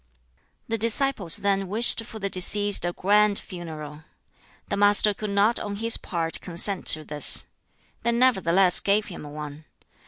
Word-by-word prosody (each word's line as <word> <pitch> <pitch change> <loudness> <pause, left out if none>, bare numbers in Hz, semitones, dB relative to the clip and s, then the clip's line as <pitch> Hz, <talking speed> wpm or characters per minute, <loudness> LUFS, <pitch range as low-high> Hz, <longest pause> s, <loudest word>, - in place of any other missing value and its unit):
The 225 0 -3
disciples 230 - +1
then 195 -1 -2
wished 225 +3 +2
for 220 - -11
the 200 -2 -4
deceased 205 +1 +1
a 175 - -2
grand 205 +2 +1
funeral. 155 -4 -10 0.6
The - - -3
Master 205 +1 +3
could 210 +1 -7
not 200 +4 +1
on 205 -1 -6
his 225 +2 +3
part 165 -2 -5
consent 180 +3 +1
to 155 - +4
this. 150 -1 +2 0.6
They 235 - -1
nevertheless 195 -7 +2
gave 205 +1 0
him 150 -5 -10
one. 150 0 -10
200 Hz, 150 wpm, -23 LUFS, 170-210 Hz, 0.6 s, to